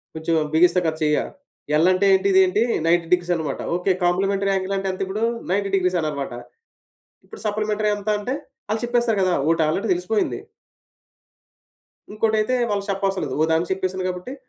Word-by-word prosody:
కొంచెం 160 +1 -1 0.2
బిగిస్తా 180 +2 +4
కదా! 155 0 -1
చెయ్య. 150 -1 +2 0.6
ఎల్ 165 +4 +4
అంటే 185 +2 +2
ఏంటి? 190 +1 +3
ఇదేంటి? 190 +3 +4 0.2
90 170 0 +2
డిగ్రీస్ 175 0 +1
అన్నమాట. 155 -4 -3
ఓకే 180 +1 +1
కాంప్లిమెంటరీ 195 +2 +1
యాంగిల్ 190 +1 -1
అంటే 195 0 -3
ఎంతిప్పుడు 190 +3 -4 0.3
"90°" 195 -2 +1
అన్నారనమాట. 140 -5 -3 0.9
ఇప్పుడు 445 - -12
సప్లిమెంటరీ 210 0 0
ఎంత 205 +1 -7
అంటే, 250 +6 -3 0.4
ఆళ్ళు 220 +1 -1
చెప్పేస్తారు 240 -3 +1
కదా! 185 -1 +2 0.2
ఓటి 165 -1 +2
ఆల్రెడీ 195 +8 -1
తెలిసిపోయింది. 180 +5 -1 1.7
ఇంకోటయితే 220 +2 +1 0.2
వాళ్ళు 200 -1 -1
చెప్పవసరం 195 0 -1
లేదు. 130 - -4
ఓ - - +4
దానికి 165 +3 0
చెప్పేసాను 185 0 -2
కాబట్టి 180 +9 -7
190 Hz, 150 wpm, -22 LUFS, 175-205 Hz, 1.7 s, బిగిస్తా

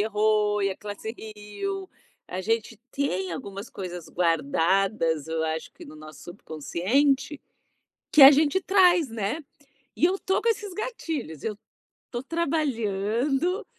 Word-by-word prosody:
errou 210 -1 +2
e 195 - +2
a 190 - -5
classe 210 +1 -6 0.2
riu. 375 - -5 0.4
A 185 - -4
gente 225 +1 -1
tem 190 -11 -1
algumas 200 +6 -7
coisas 180 -3 -7
guardadas, 165 0 +1
eu 160 0 -2
acho 160 0 -3
que - - -13
no 155 - -12
nosso 155 -1 -12
subconsciente, 260 - -1 0.7
que 300 - +6
a 270 - +13
gente 305 +6 +3
traz, 360 - +4
né, 225 +8 -3 0.5
e 335 - +3
eu 380 +2 +1
tô 380 - 0
com 465 - +2
esses 420 -3 -2
gatilhos, 325 - -5
eu 215 -2 -3 0.5
tô 240 0 -3
trabalhando, 275 - 0
220 Hz, 135 wpm, -26 LUFS, 185-300 Hz, 0.7 s, a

